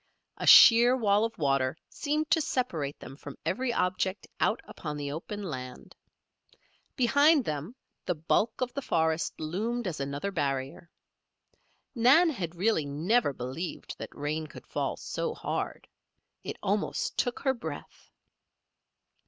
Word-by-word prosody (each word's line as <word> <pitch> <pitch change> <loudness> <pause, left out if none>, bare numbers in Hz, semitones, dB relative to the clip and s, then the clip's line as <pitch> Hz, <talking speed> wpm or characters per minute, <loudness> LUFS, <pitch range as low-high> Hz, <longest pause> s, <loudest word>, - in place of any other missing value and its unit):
A - - -4
sheer 240 +2 +9
wall 210 -3 +3
of 230 - -6
water 135 -3 +1
seemed 305 +1 -2
to 320 - +4
separate 170 - -2
them 135 - -10
from 145 -1 -10
every 255 -1 0
object 185 -2 -1
out - - +2
upon 150 -2 -6
the 145 -1 -4
open 205 +7 -6
land. 130 -8 -7 1.0
Behind 285 +2 +4
them 155 - -4 0.3
the 180 - +1
bulk 170 +10 0
of 250 -1 -1
the 280 - -3
forest 160 -7 0
loomed 215 +10 -2
as 175 -5 -3
another 140 +8 -3
barrier. 140 -1 -3 1.0
Nan 280 +8 +5
had 175 - -5
really 175 -5 +1
never 165 +7 +1
believed 135 +7 -6
that - - -6
rain 155 +2 -3
could - - -12
fall - - -2
so 465 -1 -3
hard. - - -4 0.6
It - - -5
almost - - -1
took 245 -2 -1
her 265 -1 +2
breath. 160 - -8
180 Hz, 135 wpm, -29 LUFS, 145-240 Hz, 1.0 s, sheer